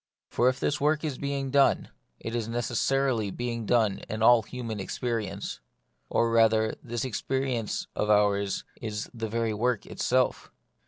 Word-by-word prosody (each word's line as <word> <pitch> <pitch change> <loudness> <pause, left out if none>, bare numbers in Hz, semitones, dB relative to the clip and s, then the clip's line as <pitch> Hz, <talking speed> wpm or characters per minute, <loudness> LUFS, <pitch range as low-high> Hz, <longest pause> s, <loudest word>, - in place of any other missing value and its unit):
For 125 - +4
if 130 +1 -3
this 145 0 0
work 150 +1 +2
is 150 -5 -3
being 140 -1 -2
done, 140 0 +3 0.3
it 115 - -5
is 115 -2 -2
neces 120 0 -2
sarily 135 -6 +1
being 115 -1 -4
done 110 -5 +2
in 110 +1 -2
all 120 0 +7
human 115 -1 -6
experience; 105 -1 -3 0.5
or 115 0 +2
rather, 110 -1 +4
this 120 +1 -3
experience 130 -1 -2
of 105 - -1
ours 100 -1 +2 0.2
is 105 -3 -4
that 115 -2 -4
very 115 0 0
work 120 +2 0
itself. 130 0 0
115 Hz, 155 wpm, -28 LUFS, 110-130 Hz, 0.5 s, all